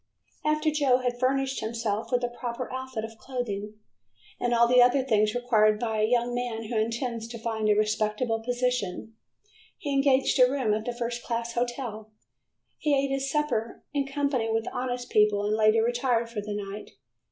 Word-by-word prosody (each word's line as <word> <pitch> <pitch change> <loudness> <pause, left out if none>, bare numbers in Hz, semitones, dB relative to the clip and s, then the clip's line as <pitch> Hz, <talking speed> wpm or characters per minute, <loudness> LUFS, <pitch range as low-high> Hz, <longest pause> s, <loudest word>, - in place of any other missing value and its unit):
After 305 0 +1
Joe 285 -4 +3
had 245 -1 -2
furnished 270 +1 +1
himself 220 -1 -3
with 245 -1 +1
a - - +2
proper 240 +1 -5
outfit 260 -4 -4
of 225 0 -12
clothing, 215 -5 -4 0.6
and 245 - 0
all 235 0 +5
the 250 +1 +6
other 250 +2 +4
things 215 -4 +2
required 215 -4 +3
by 220 -2 -1
a 215 - +3
young 240 +1 +1
man 240 -2 -3
who 225 +2 -5
intends 230 +1 -2
to 230 0 -7
find 220 -1 -1
a 210 - +5
respectable 215 +2 0
position, 245 -4 -2 0.6
he 285 -2 -3
engaged 275 -1 +3
a 250 0 +7
room 260 -6 +1
at 215 +2 -2
a - - 0
first 240 0 -3
class 235 0 -3
hotel. 240 -3 -3 0.7
He 295 -2 +2
ate 275 0 0
his 270 0 -1
supper 270 -6 -1
in 280 -1 0
company 275 -5 0
with 225 0 0
honest 245 -1 -3
people 210 -1 +3
and 210 +1 +1
later 220 +1 +4
retired 240 -1 0
for 215 -3 -3
the 205 0 -5
night. 205 0 -6
240 Hz, 180 wpm, -27 LUFS, 220-255 Hz, 0.7 s, a